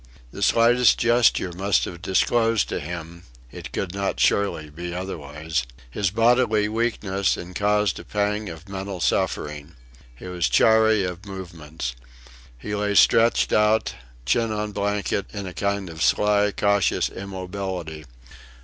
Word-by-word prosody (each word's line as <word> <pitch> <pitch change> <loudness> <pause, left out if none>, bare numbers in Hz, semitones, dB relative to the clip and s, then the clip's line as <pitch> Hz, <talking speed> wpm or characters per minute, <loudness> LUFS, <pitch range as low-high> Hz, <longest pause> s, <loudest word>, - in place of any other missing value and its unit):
The 100 - -9
slightest 120 +4 +4
gesture 120 -6 +3
must 95 +3 +1
have 85 -1 -8
disclosed 115 +4 +2
to - - -2
him 85 +1 -7 0.3
(it - - -9
could 95 -2 -3
not 100 0 -2
surely 80 -7 +1
be 85 +3 -6
otherwise) 80 -5 -4 0.3
his 100 +6 0
bodily 115 0 +3
weakness, 105 -4 -1
and 90 +1 -9
caused 105 0 +1
a - - -9
pang 105 0 -2
of 80 +2 -10
mental 95 -1 -5
suffering. 75 +1 -2 0.4
He - - -12
was 90 -2 -1
chary 110 -2 +4
of 90 +2 -5
movements. 80 -8 -7 0.6
He 105 +12 -6
lay 105 0 -1
stretched 115 +3 +4
out, 105 +1 +2 0.3
chin 110 - +1
on 105 0 -3
blanket, 100 -1 -1
in 100 -1 -4
a 90 - -7
kind 100 0 -2
of 80 -1 -8
sly, 105 +2 +3
cautious 100 -1 +1
immobility. 95 -4 -6
100 Hz, 140 wpm, -23 LUFS, 85-105 Hz, 0.6 s, slightest